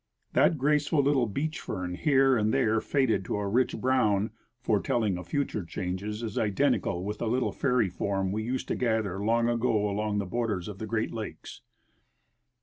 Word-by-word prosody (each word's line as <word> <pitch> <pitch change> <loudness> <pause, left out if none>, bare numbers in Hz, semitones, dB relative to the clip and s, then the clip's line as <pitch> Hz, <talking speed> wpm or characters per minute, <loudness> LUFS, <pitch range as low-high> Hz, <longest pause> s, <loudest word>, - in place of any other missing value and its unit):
That 165 - +4
graceful 145 +1 +2
little 135 -4 +2
beach 155 +9 -3
fern, 90 -3 -4
here 135 - +3
and 110 -2 +1
there 110 0 +2
faded 130 -8 +1
to - - -2
a 105 -1 -2
rich 125 +5 +1
brown, 110 -5 +2 0.3
foretelling 110 -2 +1
of 90 - -9
future 125 -2 -1
changes, 95 +6 -4
is 110 -3 -2
identical 105 -4 +1
with 105 +2 -4
the 115 - -2
little 125 +3 +1
fairy 125 -6 +1
form 95 0 -1
we 105 +2 -1
used 125 +3 -3
to - - 0
gather 110 -5 -1
long 115 +2 +2
ago 115 -3 +1
along 105 +1 -1
the 100 - -1
borders 105 -3 -2
of 100 -2 -7
the 110 - -5
Great 110 0 -1
Lakes. 110 -2 -7
110 Hz, 175 wpm, -28 LUFS, 100-125 Hz, 0.3 s, That